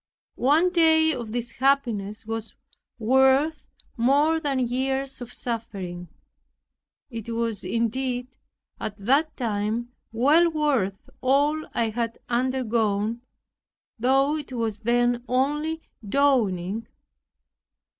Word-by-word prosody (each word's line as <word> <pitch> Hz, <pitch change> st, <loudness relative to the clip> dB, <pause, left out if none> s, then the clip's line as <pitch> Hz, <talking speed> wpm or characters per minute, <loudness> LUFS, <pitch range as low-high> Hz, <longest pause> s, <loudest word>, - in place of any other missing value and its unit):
One 315 Hz, +8 st, +4 dB
day 320 Hz, -2 st, +4 dB
of 235 Hz, -5 st, -5 dB
this 240 Hz, 0 st, -3 dB
happiness 230 Hz, -7 st, 0 dB
was 225 Hz, 0 st, -5 dB, 0.4 s
worth 265 Hz, +6 st, +3 dB, 0.3 s
more 285 Hz, +7 st, +3 dB
than 285 Hz, -4 st, -1 dB
years 265 Hz, +2 st, -1 dB
of 245 Hz, 0 st, -7 dB
suffering. 195 Hz, -8 st, -5 dB, 1.0 s
It 230 Hz, -1 st, -6 dB
was 230 Hz, -2 st, -2 dB
indeed, 245 Hz, +5 st, -2 dB, 0.4 s
at 210 Hz, -1 st, -5 dB
that 275 Hz, +10 st, +1 dB
time 225 Hz, 0 st, -2 dB, 0.2 s
well 295 Hz, +9 st, +4 dB
worth 275 Hz, -, 0 dB
all 290 Hz, +4 st, +2 dB
I 230 Hz, -1 st, +1 dB
had 230 Hz, 0 st, -2 dB
undergone, 235 Hz, -3 st, 0 dB, 0.8 s
though 270 Hz, +5 st, +3 dB
it 295 Hz, -3 st, -8 dB
was 225 Hz, -3 st, -2 dB
then 240 Hz, +1 st, +1 dB
only 295 Hz, +5 st, 0 dB, 0.2 s
dawning. 215 Hz, -5 st, +1 dB
245 Hz, 100 wpm, -25 LUFS, 225-275 Hz, 1.0 s, One